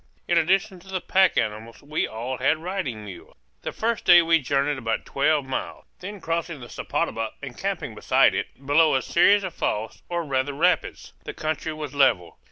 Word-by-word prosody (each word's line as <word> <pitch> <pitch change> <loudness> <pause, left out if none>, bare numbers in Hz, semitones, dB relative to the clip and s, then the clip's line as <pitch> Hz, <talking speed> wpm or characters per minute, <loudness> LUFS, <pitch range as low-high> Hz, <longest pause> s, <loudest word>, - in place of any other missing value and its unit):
In 175 - +2
addition 190 +4 +2
to 185 - -19
the 190 -1 -3
pack 190 0 +3
animals 110 +2 -3
we 150 +2 -1
all 120 +4 -5
had 140 +4 +2
riding 160 - -4
mules. 95 -3 -11 0.3
The - - -4
first 230 0 -2
day 175 -1 +7
we 165 0 +4
journeyed 140 +1 0
about 115 -2 -2
twelve 145 0 +1
miles, 130 - -5
then 200 +2 -7
crossing 165 -2 -3
the 120 - -10
Sepotuba 115 0 -3
and - - -7
camping - - -3
beside - - +3
it, 135 - -5
below 150 +2 +4
a 130 - +1
series 200 +4 +4
of 185 -3 -4
falls, 110 +1 -3
or 175 -1 -1
rather 135 0 -1
rapids. 175 +6 0
The - - -6
country 155 +1 -3
was 155 -3 -6
level. 130 -12 +2
150 Hz, 185 wpm, -24 LUFS, 130-175 Hz, 0.3 s, day